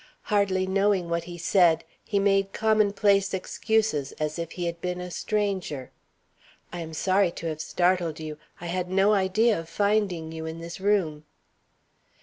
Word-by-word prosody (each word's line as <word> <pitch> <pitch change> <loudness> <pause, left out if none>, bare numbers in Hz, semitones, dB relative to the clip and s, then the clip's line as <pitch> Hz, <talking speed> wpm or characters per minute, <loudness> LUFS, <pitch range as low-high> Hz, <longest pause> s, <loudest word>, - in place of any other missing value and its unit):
Hardly 195 -2 +2
knowing 195 -2 +1
what 170 0 -1
he 175 0 -8
said, 175 -1 +3 0.2
he 205 - -1
made 195 0 +2
commonplace 205 -2 +2
excuses, 205 -6 0
as 155 +2 -3
if 165 -1 -4
he 175 - -3
had 170 0 -4
been 180 0 -3
a 180 0 -6
stranger: 190 - -2 0.8
"I 175 - -4
am 160 -1 -6
sorry 190 +2 +3
to - - -8
have 155 -1 -3
startled 175 -3 +1
you; 155 -1 -6 0.2
I 175 - -8
had 180 +1 -2
no 195 +3 +4
idea 205 +2 +2
of 165 0 -9
finding 200 -6 0
you 160 0 -6
in 160 +1 -6
this 170 +2 -7
room." 185 -7 +1
180 Hz, 160 wpm, -26 LUFS, 165-200 Hz, 0.8 s, no